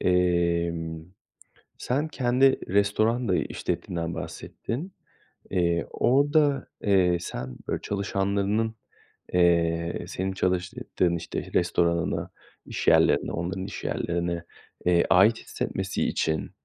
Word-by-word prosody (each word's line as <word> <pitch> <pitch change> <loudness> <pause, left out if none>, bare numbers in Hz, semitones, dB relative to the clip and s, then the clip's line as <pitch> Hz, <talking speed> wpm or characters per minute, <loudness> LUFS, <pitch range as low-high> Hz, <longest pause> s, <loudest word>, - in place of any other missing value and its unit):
emm, 85 -2 +1 0.7
sen 140 +5 -1
kendi 130 -1 +3
restoran 110 +4 +2
da 90 - +3
işlettiğinden 85 -1 -3
bahsettin. 160 +12 -6 0.6
İii, 85 -2 +1
orada, 145 +1 +3 0.2
eee, 95 -3 +4
sen, 65 -7 -6
böyle, - - -2
çalışanlarının, 100 +2 -1 0.6
eee, 85 -1 +2
senin 95 +1 -3
çalıştığın, 90 -1 0
işte, 85 - -5
restoranına, 85 -1 +1 0.4
iş - - -5
yerlerine, - - +4
onların 95 +3 -3
iş 100 - -7
yerlerine, 85 0 -2 0.4
eee, 85 -1 +4
ait 100 +7 +6
hissetmesi - - -3
için 80 -1 -1
90 Hz, 95 wpm, -26 LUFS, 85-110 Hz, 0.7 s, ait